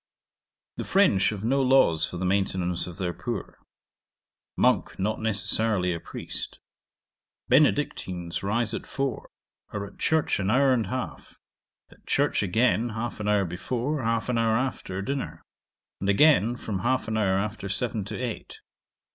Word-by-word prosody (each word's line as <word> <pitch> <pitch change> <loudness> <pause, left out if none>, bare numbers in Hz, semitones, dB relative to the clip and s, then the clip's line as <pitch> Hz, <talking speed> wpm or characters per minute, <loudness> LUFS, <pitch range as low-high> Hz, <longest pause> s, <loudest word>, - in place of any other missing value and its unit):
'The - - -3
French 100 - +4
have 105 -2 -5
no 135 +5 +2
laws 125 -12 +4
for 90 - -7
the 95 - -2
maintenance 90 -2 0
of 90 - -8
their 90 -3 -2
poor. - - -5 1.0
Monk - - +2
not 110 +3 -1
necessarily 105 -3 0
a 85 - -4
priest. - - -6 0.9
Benedictines 90 -2 +1
rise 110 +3 0
at - - -5
four; 135 -4 -3 0.4
are 100 -1 -4
at 100 - -14
church 160 -7 +1
an 95 0 0
hour 135 +3 +4
and 115 -5 0
half; 130 +4 -5 0.5
at - - -20
church - - +2
again 110 +3 +2
half 115 +1 -4
an 105 - -3
hour 105 -2 +3
before, 125 - -2
half 115 -1 0
an 125 -2 +1
hour 110 -1 +3
after, 115 -7 -3
dinner; 140 +4 -4 0.6
and 100 - -1
again 120 0 +5
from 105 -5 -4
half 130 +5 0
an 110 - -2
hour 95 -3 +2
after 105 0 -3
seven 110 0 -1
to - - -5
eight. 125 -3 -5
110 Hz, 155 wpm, -26 LUFS, 95-125 Hz, 1.0 s, again